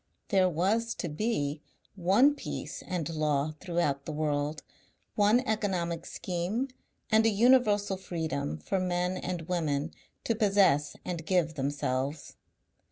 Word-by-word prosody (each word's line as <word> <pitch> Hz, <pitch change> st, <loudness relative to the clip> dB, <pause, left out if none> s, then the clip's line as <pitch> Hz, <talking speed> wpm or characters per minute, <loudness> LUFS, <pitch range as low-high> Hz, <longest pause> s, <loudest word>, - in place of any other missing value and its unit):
There 190 Hz, -3 st, +4 dB
was 210 Hz, +8 st, 0 dB
to -, -, -3 dB
be 150 Hz, -4 st, -1 dB, 0.3 s
one 200 Hz, +10 st, +4 dB
peace 290 Hz, -, -6 dB
and 175 Hz, -5 st, -2 dB
law 155 Hz, -2 st, 0 dB
throughout 170 Hz, -6 st, -1 dB
the -, -, -4 dB
world, 150 Hz, 0 st, -1 dB, 0.5 s
one 210 Hz, +4 st, +4 dB
economic 185 Hz, -8 st, -1 dB
scheme 190 Hz, +9 st, -2 dB, 0.4 s
and 220 Hz, 0 st, +5 dB
a 225 Hz, -, +5 dB
universal 210 Hz, -3 st, +4 dB
freedom 160 Hz, -, -3 dB
for 190 Hz, -, -2 dB
men 180 Hz, 0 st, 0 dB
and 180 Hz, -2 st, -4 dB
women 160 Hz, -3 st, -1 dB, 0.3 s
to 230 Hz, -, +1 dB
possess 195 Hz, -, +3 dB
and 170 Hz, -2 st, -4 dB
give 170 Hz, -2 st, +1 dB
themselves. 140 Hz, 0 st, -2 dB
175 Hz, 125 wpm, -29 LUFS, 150-205 Hz, 0.5 s, and